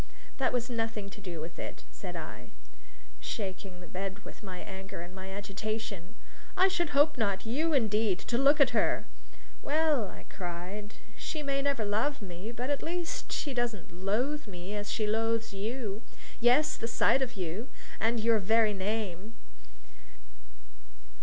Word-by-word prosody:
"That 265 - +3
has 245 -1 +1
nothing 225 -4 -2
to 205 - -10
do 180 -4 -5
with 165 +2 -6
it," - - -5
said - - -6
I, - - -6 0.7
shaking 190 -2 -4
the 175 - -10
bed 195 +3 -4
with - - -10
my 190 -4 -6
anger 190 -2 -6
and 175 +1 -8
my 190 0 -7
agitation. 200 -1 -4 0.4
"I 380 +1 +7
should 345 -4 +1
hope 300 +1 +5
not! 200 -2 +1
You, 305 +8 +2
indeed, 215 -6 +3
to 235 - 0
look 285 +3 +6
at 275 -3 +7
her!" - - +3 0.6
"Well," 300 -6 +3
I - - -10
cried, 185 +3 -5 0.2
"she 305 -2 -3
may 275 -1 +1
never 275 -6 +1
love 225 +9 +1
me; 190 +2 -6
but 245 +3 -2
at 285 - +1
least 345 0 -2
she 285 - -1
doesn't 230 -8 -1
loathe 230 - 0
me 185 0 -6
as 205 0 -2
she 215 - +1
loathes 225 +1 +1
you 215 +1 -2 0.4
yes, 250 +6 +5
and - - -17
the 230 - 0
sight 260 +3 +4
of 250 -2 -1
you, 190 +5 -3 0.3
and 230 +1 +2
your 225 0 +4
very 220 +1 +4
name!" 205 0 -2
220 Hz, 160 wpm, -31 LUFS, 195-250 Hz, 0.7 s, I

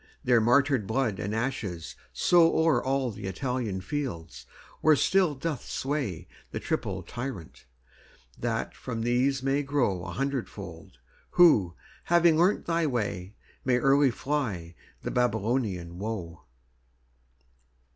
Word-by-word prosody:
Their 120 -2 +4
martyred 130 -1 +3
blood 115 -7 0
and 100 +4 -3
ashes 105 -9 -3 0.2
sowO'er 165 -5 +4
all 130 -2 0
the 100 -1 -7
Italian 110 -1 -2
fields, 120 - -5 0.3
where 155 -1 +5
still 180 +1 +2
doth 145 -1 -3
swayThe 125 - -3 0.3
triple - - -2
Tyrant; 120 - -7 0.7
that - - -2
from 115 -3 -5
these 130 +3 +1
may 135 +1 +1
growA 100 -12 -1
hundredfold, 135 0 -5 0.4
who, 105 - +6 0.3
having 170 -1 +5
learnt 175 +5 +2
thy 165 -1 +1
way, 105 -7 -3 0.3
Early 135 +3 +4
may - - +2
fly 115 - -3 0.3
the - - -3
Babylonian 110 -7 -1
woe. 95 -7 -5
125 Hz, 110 wpm, -28 LUFS, 100-140 Hz, 0.7 s, who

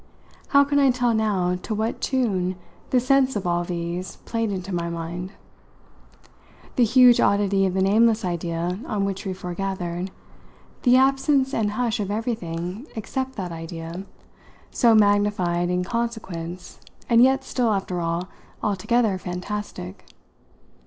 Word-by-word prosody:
How 280 0 +5
can 285 0 +1
I 275 -1 +5
tell 245 -1 +2
now 195 -5 +1
to 220 - -3
what 220 +2 -2
tune 195 -9 0 0.3
the 255 - +3
sense 265 0 +3
of 200 -2 -2
all 175 0 +1
these 175 +1 -4
played 225 -2 -1
into 190 0 -4
my 170 -1 -1
mind? 170 +2 -5 1.4
the 250 - +4
huge 245 +1 +6
oddity 200 -1 +3
of 185 - -3
the 190 - +2
nameless 220 +2 +3
idea 175 +1 -2
on 200 -2 -1
which 195 0 -4
we 190 - -2
foregathered, 180 0 -4 0.7
the 250 0 +5
absence 270 +1 +3
and 210 -2 0
hush 235 0 -1
of 200 -2 -2
everything 205 - -3
except 260 +4 -4
that 185 -4 -4
idea, 165 +2 -6 0.7
so 230 -2 +4
magnified 205 -4 +2
in 180 0 0
consequence 185 -6 -4 0.3
and 235 -1 +5
yet 265 +2 +4
still, 245 -3 0
after 190 -3 -1
all, 170 +2 -2 0.4
altogether 210 0 +1
fantastic. 180 - -6
200 Hz, 140 wpm, -24 LUFS, 180-235 Hz, 1.4 s, huge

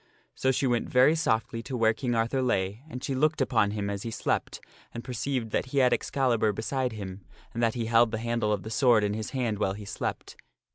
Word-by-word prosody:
So 130 - 0
she 135 - 0
went 120 -2 0
very 130 +4 +5
softly 115 -7 0
to 125 +2 -5
where 115 -1 +3
King 120 +1 -2
Arthur 115 +4 +1
lay, 100 -3 0
and 125 -3 -7
she 135 - -2
looked 155 +4 +1
upon 120 -6 +2
him 100 -1 -3
as 100 -1 -3
he 115 - -4
slept 115 - -2 0.3
and 120 - -7
perceived 125 -2 -3
that - - -1
he 140 - -4
had 130 -2 +5
Excalibur 120 -5 +1
beside 125 +3 -2
him 95 -2 -7 0.3
and 115 - -3
that 115 0 +2
he 115 -2 -2
held 115 +1 +4
the 110 - -3
handle 115 -1 -1
Morgana 105 -1 +1
of - - -13
the 110 - -7
sword 120 -3 +4
in 105 0 0
his 110 0 -4
hand 120 -6 -2
while 95 -2 +1
he 105 +1 -8
slept. - - -5
115 Hz, 235 wpm, -28 LUFS, 110-130 Hz, 0.3 s, very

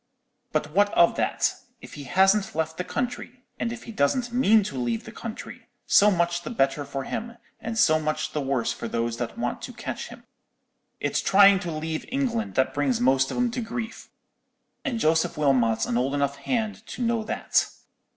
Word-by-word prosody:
But - - -1
what 205 +4 +3
of 170 - +5
that? - - +1 0.3
If - - -12
he 145 - -8
hasn't 195 +5 +3
left 160 0 -2
the 180 - -2
country, 245 +4 -4 0.2
and 230 - -1
if 240 0 -7
he - - -8
doesn't 235 - 0
mean 225 -4 +5
to 140 - -6
leave 120 -3 -2
the - - -10
country, - - -8 0.2
so 210 - +6
much 175 -2 +1
the - - -6
better 140 - 0
for 140 -1 -4
him, 235 - -5 0.2
and 225 0 -5
so 155 -7 +4
much 155 0 -2
the 150 - -2
worse 135 -4 0
for 115 - -6
those 115 0 -2
that 120 -1 -4
want 120 +1 -3
to - - -7
catch - - -5
him. - - -12 0.8
It's - - 0
trying 200 0 +6
to 175 -2 -4
leave 155 0 -4
England 245 -4 -2
that 130 - +2
brings 140 -3 +1
most 135 +2 +3
of - - -4
'em 245 -1 +1
to 245 - -3
grief, 225 0 -6 0.7
and 260 -7 -2
Joseph 160 -3 +2
Wilmot's 120 -6 +2
an 120 - 0
old 135 +3 0
enough 140 0 0
hand 220 - -2
to 250 - -5
know 230 -1 0
that. - - +1
170 Hz, 195 wpm, -25 LUFS, 135-225 Hz, 0.8 s, so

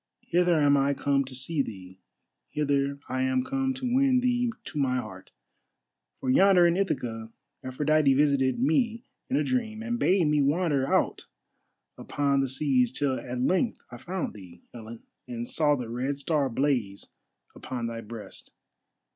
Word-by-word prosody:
Hither 175 -1 +2
am 145 -1 +4
I 140 +1 +1
come 140 0 +1
to 130 0 -8
see 140 +4 0
thee, 95 -6 -8 0.5
hither 140 -1 0
I 130 0 -2
am 130 -1 +1
come 270 - -1
to 255 -2 -2
win 265 -1 +4
thee 245 -1 +1
to 150 - -6
my 130 -2 +1
heart. 95 -7 -7 0.9
For 130 - -1
yonder 185 +3 +5
in 170 0 +3
Ithaca 120 -12 -2 0.3
Aphrodite 145 +2 +2
visited 135 -3 +2
me 225 - +1 0.3
in 260 - 0
a - - +2
dream, 225 -4 -2
and 235 0 -2
bade 185 -2 +3
me 150 -1 +2
wander 145 -2 +1
out - - 0 0.7
upon 140 -1 0
the 135 - -1
seas 130 -3 +1
till 130 0 -1
at 125 0 -5
length 185 - 0
I 120 - -8
found 180 +7 -4
thee, 90 -4 -14
Helen, 115 -1 -10 0.2
and 120 -1 -5
saw 150 -2 +2
the 125 -4 -5
Red 130 +4 -3
Star 145 -1 0
blaze 120 -6 -1 0.5
upon 125 -2 -5
thy 115 0 -5
breast. 110 -2 -10
140 Hz, 160 wpm, -27 LUFS, 125-170 Hz, 0.9 s, yonder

